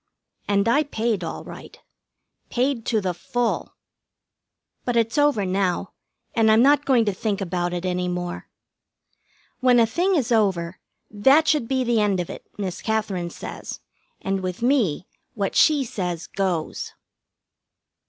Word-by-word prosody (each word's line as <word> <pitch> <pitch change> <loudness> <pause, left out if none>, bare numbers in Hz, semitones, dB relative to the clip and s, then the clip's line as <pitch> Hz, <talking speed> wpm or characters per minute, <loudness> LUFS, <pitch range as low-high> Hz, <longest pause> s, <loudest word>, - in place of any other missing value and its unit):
And 200 +1 +2
I 275 +6 +4
paid 230 -7 -1
all - - -5
right. - - -11 0.7
Paid 250 -1 -1
to 220 -3 +1
the 185 -2 -1
full. 240 +7 -2 1.1
But 245 - -1
it's 230 -1 +1
over 290 -9 +3
now, 185 -1 -1 0.4
and 225 -1 +3
I'm 220 +2 +6
not 290 +1 +4
going 245 -4 +3
to 205 - 0
think 200 +1 -2
about 175 -2 -2
it 175 +1 -3
any 180 0 -1
more. 175 0 -4 1.1
When 250 -1 +5
a 230 - +6
thing 355 - +1
is 260 -6 0
over, 185 -6 +1 0.3
that 270 +10 +4
should 295 -7 +2
be 260 0 +1
the 235 -3 +2
end 200 -3 +1
of 175 - -3
it, - - -10
Miss 190 -4 -4
Katherine 205 -6 -1
says, - - -8 0.4
and 195 0 -2
with 185 +3 -4
me 235 - +2 0.3
what 200 -3 -2
she 300 -3 +5
says 180 -7 -4
goes. 180 -5 -3
215 Hz, 150 wpm, -23 LUFS, 185-245 Hz, 1.1 s, I'm